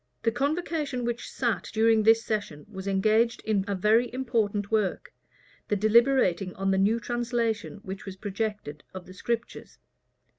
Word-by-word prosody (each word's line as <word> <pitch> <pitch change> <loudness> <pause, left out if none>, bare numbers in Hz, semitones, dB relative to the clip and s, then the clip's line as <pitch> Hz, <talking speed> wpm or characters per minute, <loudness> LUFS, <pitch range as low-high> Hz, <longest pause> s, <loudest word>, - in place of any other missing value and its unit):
The 230 - +2
convocation 285 -1 -2
which 240 0 -3
sat 235 -5 -1
during 225 0 +4
this 225 +1 +4
session 205 -9 -3
was 195 -2 -8
engaged 215 +4 +2
in 210 -3 +1
a 200 - -1
very 220 +5 +3
important 225 -5 -1
work, 215 -4 -1 0.5
the 210 - +1
deliberating 215 -3 +3
on 195 0 0
the 190 - +2
new 215 +4 +3
translation 235 -3 -2
which 195 +1 -7
was 190 - -6
projected 205 -6 -4
of 185 -1 -7
the 185 - -12
Scriptures. 235 +4 -4
220 Hz, 150 wpm, -27 LUFS, 195-235 Hz, 0.5 s, during